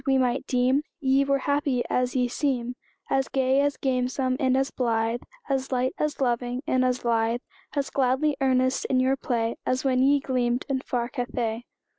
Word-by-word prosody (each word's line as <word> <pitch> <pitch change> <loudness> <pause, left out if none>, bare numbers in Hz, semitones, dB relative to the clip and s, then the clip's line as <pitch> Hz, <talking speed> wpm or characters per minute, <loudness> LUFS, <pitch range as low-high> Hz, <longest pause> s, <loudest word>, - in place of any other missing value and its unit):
we 270 0 +4
might 260 +1 0
deem 255 +2 +2 0.2
Ye 270 -2 +3
were 275 0 +2
happy 285 -2 0
as 250 0 0
ye 250 -1 +2
seem 250 -2 -1 0.4
As 270 0 +2
gay, 265 0 +2
as 285 -1 0
gamesome, 255 0 0
and 260 -2 +2
as 270 +1 0
blithe, 230 -1 0 0.3
As 270 -1 -1
light, 255 +2 +1
as 300 0 -1
loving, 245 0 -1
and 255 0 +2
as 250 -1 0
lithe, 230 +1 +1 0.3
As 280 -1 -1
gladly 275 +3 +1
earnest 260 0 +2
in 255 - +2
your 260 +1 +3
play, 235 -4 -1
As 255 0 0
when 255 -1 +3
ye 280 +2 +4
gleamed 250 -2 0
in 270 -2 0
far 245 -2 -2
Cathay. 240 -2 -3
255 Hz, 180 wpm, -26 LUFS, 245-270 Hz, 0.4 s, we